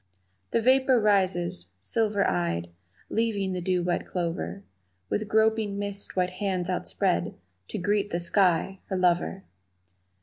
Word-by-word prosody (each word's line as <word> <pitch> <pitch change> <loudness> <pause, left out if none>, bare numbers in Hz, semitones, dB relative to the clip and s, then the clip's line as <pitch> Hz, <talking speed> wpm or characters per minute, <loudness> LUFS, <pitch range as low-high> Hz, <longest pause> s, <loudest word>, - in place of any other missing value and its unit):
The 230 - +1
vapor 260 0 +5
rises, 185 - +1
silver 205 - +1
eyed, 85 -1 -1 0.4
Leaving 210 -4 0
the 180 - -3
dew 180 0 +1
wet 175 0 -1
clover, 100 - -3 0.5
With 215 0 0
groping, 220 -1 +2
mist 200 0 -4
white 180 -1 +1
hands 185 -2 -2
outspread 85 - -1 0.3
To - - -5
greet 205 +2 0
the 170 - -1
sky, 180 +1 +2
her 190 - -2
lover. 180 +1 +1
190 Hz, 130 wpm, -27 LUFS, 175-205 Hz, 0.5 s, vapor